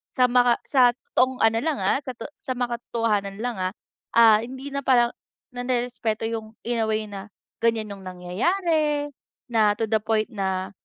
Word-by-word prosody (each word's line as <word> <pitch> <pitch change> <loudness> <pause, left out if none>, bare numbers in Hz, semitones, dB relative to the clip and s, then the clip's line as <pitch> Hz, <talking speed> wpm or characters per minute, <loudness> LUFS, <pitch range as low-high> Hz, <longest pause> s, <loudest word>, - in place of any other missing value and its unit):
Sa 250 -1 +5
mga 245 -1 +4
sa 255 -3 +5
totoong 255 0 0
ano 225 0 +4
lang 315 -2 0
ah - - +2
sa 255 - -4 0.3
sa 260 - -3
makatotohanan 230 -4 -1
lang 245 -3 -2
ah, 185 +1 -1 0.4
ah 225 -2 +7
hindi 265 +3 -7
na 280 - -1
parang 240 -2 +4 0.4
narerespeto 245 -3 -2
yung 220 -1 -6
in 235 0 -1
a 220 - -1
way 215 0 0
na 200 0 -7 0.4
ganyan 225 -2 +1
yung 195 -1 -12
nangyayari, 295 - 0 0.4
na 215 -3 +4
to 225 - -3
the 220 - +4
point 220 +1 0
na, 190 -2 -2
230 Hz, 165 wpm, -24 LUFS, 215-250 Hz, 0.4 s, ah